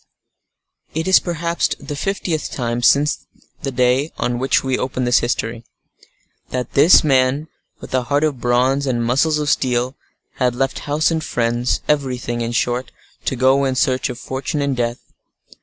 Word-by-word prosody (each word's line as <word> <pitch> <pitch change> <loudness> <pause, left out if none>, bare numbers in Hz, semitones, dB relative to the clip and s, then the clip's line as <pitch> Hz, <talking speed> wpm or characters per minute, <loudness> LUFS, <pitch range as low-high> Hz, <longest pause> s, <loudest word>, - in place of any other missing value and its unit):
It 160 +1 -1
was 190 - +6
perhaps 170 -1 -1
the 145 +1 -6
fiftieth 175 -1 -2
time 120 -2 -2
since 145 +4 +3 0.3
the 135 - -2
day 125 +4 +1
on 120 0 -1
which 130 +1 +2
we 130 -1 0
open 130 0 -2
this 120 0 +4
history, 115 -1 -2 0.9
that 125 -1 -4
this 150 +6 +6
man, 135 +1 +2 0.3
with - - -10
a 130 - +2
heart 145 +5 +1
of 145 -6 -1
bronze 130 +3 +2
and 120 -2 0
muscles 145 +6 +2
of 150 -1 -2
steel, 125 -1 0 0.4
had 125 -2 +1
left 135 +1 -1
house 150 +3 +2
and 160 -1 -1
friends, 120 -2 0
everything, 125 -5 -1
in 115 0 -2
short, 120 +2 -1 0.3
to - - 0
go 130 +2 +3
in 135 -1 0
search 130 +1 +1
of 125 - -5
fortune 135 +3 -4
and 140 -1 0
death. 120 0 -1
130 Hz, 165 wpm, -19 LUFS, 120-145 Hz, 0.9 s, was